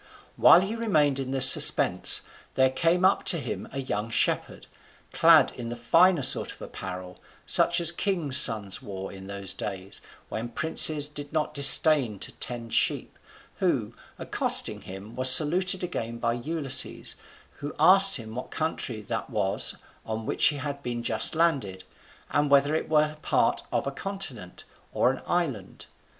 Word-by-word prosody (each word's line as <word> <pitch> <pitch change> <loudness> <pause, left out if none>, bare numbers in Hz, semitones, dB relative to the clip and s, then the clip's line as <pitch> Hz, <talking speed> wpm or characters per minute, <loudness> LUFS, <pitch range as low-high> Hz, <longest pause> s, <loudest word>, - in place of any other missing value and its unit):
While 175 - +5
he 200 +4 -5
remained 155 -12 -1
in 135 -1 -6
this 130 -1 +6
suspense, - - +5 0.3
there 130 0 +2
came 170 +6 0
up 190 - +1
to 180 - +4
him 150 - -7
a 135 - -7
young 115 -4 -5
shepherd, 115 - -2 0.5
clad 160 -4 +4
in 120 -2 -9
the 120 - -6
finer 165 +7 +2
sort 130 - +1
of - - -15
apparel, 90 -1 -10 0.3
such 170 +1 +3
as 170 -1 +4
kings' 170 -7 -2
sons 105 -7 +3
wore 95 -1 -9
in 95 0 -12
those 100 -2 -5
days 95 0 -7 0.3
when 115 +2 -6
princes 155 +2 +3
did 145 -1 -10
not 155 -1 -3
disdain 140 -5 +3
to - - -7
tend 115 -2 -7
sheep, - - -2 0.4
who, - - -2 0.2
accosting - - +1
him, 95 +4 -12
was 130 0 +2
saluted 180 +7 +3
again 115 -10 -6
by 115 0 -2
Ulysses, 140 +2 -2 0.4
who 145 +1 -8
asked 190 +4 +6
him 110 -2 -10
what 125 +2 -8
country 130 -8 -5
that 110 +4 -6
was 105 -5 -2 0.3
on 110 0 -7
which - - -1
he 150 - -1
had 140 0 -7
been 120 -2 -6
just 110 +6 +1
landed, 135 - -2 0.5
and 145 0 -1
whether 140 +1 +2
it 155 - -4
were 155 0 0
part - - -1
of - - -2
a 140 - -4
continent, 135 - -7 0.3
or 125 - +1
an 135 - -9
island. 140 - -4
135 Hz, 160 wpm, -25 LUFS, 115-160 Hz, 0.5 s, this